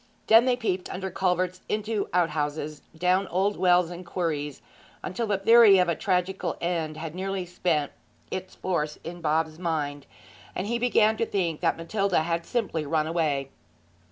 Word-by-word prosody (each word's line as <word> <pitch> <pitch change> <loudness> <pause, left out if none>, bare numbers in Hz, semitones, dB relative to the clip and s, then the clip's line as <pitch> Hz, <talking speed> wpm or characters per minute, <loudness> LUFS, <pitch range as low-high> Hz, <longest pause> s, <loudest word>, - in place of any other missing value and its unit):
Then 225 +2 +7
they 255 -1 +3
peeped 190 -7 -2
under 190 0 -4
culverts, 185 0 0
into 210 -1 -1
outhouses, 155 -3 -1
and 160 - -20
down 185 +2 +2
old 195 +3 0
wells 180 -1 +3
and 175 +1 -7
quarries, 155 -5 -3 0.5
till 230 +4 -2
the 205 -2 +1
theory 225 0 +7
of 180 -2 +3
a 170 - +1
tragical 185 +3 -1
end 165 -3 -2
had 160 -1 -6
nearly 190 0 -3
spent 170 -4 -1 0.4
its 185 0 -5
force 155 -5 -2
in 175 +1 -7
Bob's 160 0 0
mind, 145 -5 -2 0.5
and 185 - -2
he 235 +3 -1
began 220 -3 +3
to 230 - +1
think 170 -6 -1
that - - +1
Matilda 190 +1 0
had 170 0 -2
simply 205 -10 -1
run 155 +1 0
away. 150 -5 -1
180 Hz, 165 wpm, -26 LUFS, 160-195 Hz, 0.5 s, Then